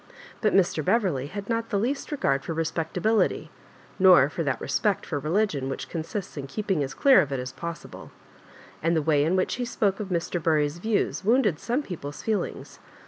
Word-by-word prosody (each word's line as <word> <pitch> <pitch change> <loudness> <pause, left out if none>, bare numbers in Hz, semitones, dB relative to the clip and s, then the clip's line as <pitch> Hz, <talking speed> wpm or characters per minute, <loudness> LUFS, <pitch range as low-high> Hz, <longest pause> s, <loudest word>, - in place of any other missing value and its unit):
But 215 - +2
Mr. 175 -5 +2
Beverley 175 - +1
had 200 +5 -7
not 230 0 -1
the 205 - 0
least 260 +10 -2
regard 140 - 0
for 165 - -4
respectability, 165 +6 0 0.5
nor 180 -7 +7
for 170 - -3
that 140 -5 -1
respeet 210 -3 0
for 145 - -3
religion 155 -3 0
which 135 - -5
consists 170 +3 -5
in 140 -1 -5
keeping 190 -1 -1
as 135 +1 -5
clear 270 -7 +6
of 145 -5 -3
it 135 - -1
as 125 0 -5
possible; 170 -1 -8 0.7
and 165 +1 +1
the 160 - +1
way 145 -2 +3
in 165 +5 +1
which 185 +4 0
he - - +1
spoke 210 -5 0
of 210 - -4
Mr. 175 -1 -2
Bury*s 155 0 +1
views 215 0 -1
wounded 215 - +2
some 250 +5 -1
people's 150 - -7
feelings. 220 -2 -3
175 Hz, 190 wpm, -26 LUFS, 150-210 Hz, 0.7 s, nor